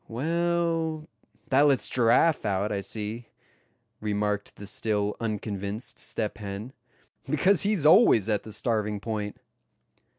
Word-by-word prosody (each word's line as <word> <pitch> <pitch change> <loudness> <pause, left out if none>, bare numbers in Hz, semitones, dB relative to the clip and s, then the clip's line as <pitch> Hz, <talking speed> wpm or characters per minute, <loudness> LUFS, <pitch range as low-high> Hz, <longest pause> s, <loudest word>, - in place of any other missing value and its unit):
"Well, 165 +3 -1 0.4
that 135 +1 +4
lets 140 -2 +3
Giraffe 125 +6 +3
out, 100 0 -1
I 100 -1 -1
see," 110 +3 -4 0.7
remarked 105 -1 -2
the 100 - -10
still 105 0 -1
unconvinced 105 0 -4
Step 110 0 -3
Hen. 105 +4 -6 0.6
"Because 185 +6 +3
he's 200 -7 +1
always 150 - +6
at 105 -2 +1
the 110 - -11
starving 105 -1 -1
point." 105 -1 -4
110 Hz, 120 wpm, -27 LUFS, 105-150 Hz, 0.7 s, always